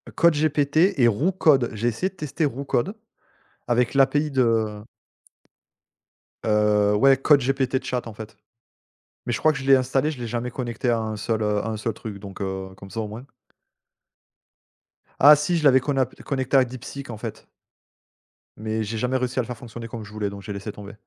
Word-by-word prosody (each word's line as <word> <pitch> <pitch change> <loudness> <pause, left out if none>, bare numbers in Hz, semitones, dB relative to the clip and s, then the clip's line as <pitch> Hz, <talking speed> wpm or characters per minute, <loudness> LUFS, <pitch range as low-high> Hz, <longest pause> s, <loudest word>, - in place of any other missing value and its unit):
Code 170 -1 +5
GPT 155 +4 +2
et 120 - +6
Roo 130 - +1
Code, 145 -9 +3
j'ai 110 +3 -2
essayé 120 - -2
de - - -27
tester 155 0 -2
Roo 140 0 -3
Code 165 - -1 0.7
avec 120 +1 +1
l'API 145 +2 +3
de 115 -5 +1 1.6
Heu 105 -1 +3
ouais, 135 +5 +5
Code 140 +2 +5
GPT 130 0 0
Chat, 125 -2 -3
en 115 - -8
fait. 110 0 -10 0.9
Mais 120 - -1
je - - -2
crois 155 - +4
que 135 - -5
je - - -7
l'ai 135 0 +7
installé, 130 +3 +1
je 135 - -9
l'ai 120 - -4
jamais 120 +2 -3
connecté 120 -1 -3
à 115 -1 +2
un 110 -1 -4
seul, 110 +1 -2
heu, 105 -1 +1
à - - -4
un 110 -1 -3
seul 110 +1 -2
truc 105 -3 -8
donc, 100 0 -9
heu, 95 -1 -4
comme 100 - -12
ça, 105 +4 -5
au 110 - -4
moins. 110 +5 -9 1.9
Ah 150 +2 +9
si 155 +4 0
je 160 - -2
l'avais 135 -3 +6
conap 130 -1 -1
connecté 135 -1 0
à 130 - +6
Deepseek, 130 +2 -8
en 110 - -6
fait! - - -7 1.1
Mais 110 +1 -2
j'ai 110 +1 -4
jamais 125 +3 -1
réussi 125 0 -2
à - - +4
le - - -5
faire 125 - -6
fonctionner 115 0 -9
comme 115 -1 -7
je 105 - -12
voulais 105 -1 -3
donc 100 0 -9
j'ai 100 +1 -6
laissé 100 +2 -6
tomber. 100 0 -10
120 Hz, 200 wpm, -24 LUFS, 110-135 Hz, 1.9 s, Ah